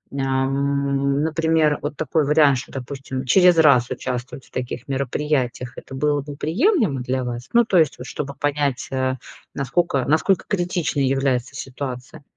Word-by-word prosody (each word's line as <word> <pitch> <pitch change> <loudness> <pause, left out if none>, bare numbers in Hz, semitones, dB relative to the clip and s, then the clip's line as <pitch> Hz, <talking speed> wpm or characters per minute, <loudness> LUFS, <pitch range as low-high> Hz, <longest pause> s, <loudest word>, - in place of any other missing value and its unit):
ам, 140 +1 0
например, 160 -1 +2
вот 145 0 -4
такой 155 +1 0
вариант, 145 -2 +4
что, - - -10
допустим, 135 0 -6
через 180 +4 +5
раз 140 -6 +5
участвовать 125 +2 -5
в - - -25
таких 125 -1 -5
мероприятиях. 135 -2 -2
Это 135 - -9
было 145 +1 +1
бы 145 0 -8
приемлемо 200 - +1
для 130 +1 -2
вас? 120 0 -5
Ну 235 -1 +5
то 185 -6 +3
есть 155 -4 +2
чтобы 140 +2 -6
понять, 145 -2 -1
э, 130 0 0 0.4
насколько 140 0 0
насколько 160 +6 +2
критичной 175 -7 0
является 135 -1 0
ситуация? 130 0 -7
140 Hz, 145 wpm, -22 LUFS, 130-150 Hz, 0.4 s, через